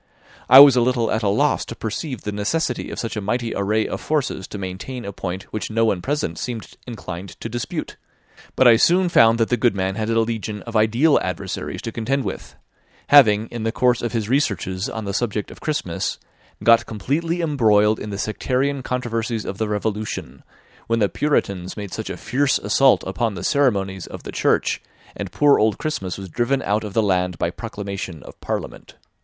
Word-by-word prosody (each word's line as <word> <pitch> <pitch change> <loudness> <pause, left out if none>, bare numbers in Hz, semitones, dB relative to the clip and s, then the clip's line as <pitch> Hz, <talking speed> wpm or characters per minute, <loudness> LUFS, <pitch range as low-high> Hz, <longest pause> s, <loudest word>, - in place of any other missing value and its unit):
I 130 +2 +11
was 140 -3 +9
a 125 - +4
little 120 -2 +1
at 110 - 0
a 105 - +1
loss 100 - +2
to - - -7
perceive 125 +4 -4
the 105 - -3
necessity 120 +6 -1
of - - -7
such 115 - -4
a 105 - -3
mighty 115 +3 -2
array 105 +2 0
of - - -5
forces 145 -10 -1
to - - -7
maintain 100 +6 -6
a 100 - -5
point 95 +1 -5
which 110 - -3
no 115 +1 +2
one 100 -5 0
present 130 - -2
seemed 120 -3 -6
inclined 95 -5 -7
to - - -5
dispute; 120 +1 -5 0.6
but 130 - +5
I 115 -2 +8
soon 180 +8 +4
found 115 -7 +5
that 115 -1 +1
the 125 - +2
good 115 -2 +2
man 95 0 -1
had 110 +2 -3
a 115 0 +2
legion 110 -2 -2
of 115 -1 -8
ideal 115 +8 +4
adversaries - - -4
to 115 - -4
contend 130 +5 -1
with; - - -6 0.5
having, 110 -7 +6
in 120 - -6
the 115 0 0
course 125 0 +2
of 120 - -2
his 115 -3 -2
researches 100 -7 0
on 110 -1 -5
the 100 - -3
subject 105 -2 -2
of - - -13
Christmas, 150 - -2 0.5
got 115 0 +5
completely 155 - -2
embroiled 110 -8 +3
in 105 - -6
the 100 - -4
sectarian 130 +6 -1
controversies 115 -3 -2
of 100 - -5
the 110 - 0
Revolution, 105 0 -3 0.5
when 115 - +1
the 105 -3 +2
Puritans 100 -12 -1
made 100 -3 -6
such - - -5
a - - -5
fierce 140 +1 +1
assault 130 +6 +3
upon 115 -4 -1
the 85 - -6
ceremonies 100 - +1
of - - -9
the - - -7
Church, - - +1 0.3
and - - -5
poor 145 -1 +4
old 110 -2 +2
Christmas 95 - -3
was 95 -1 -7
driven 120 +8 0
out 105 +2 0
of 105 -2 -6
the 110 - +3
land 90 -3 0
by 85 - -1
proclamation 100 - -6
of - - -14
Parliament. - - -5
110 Hz, 200 wpm, -21 LUFS, 100-125 Hz, 0.6 s, I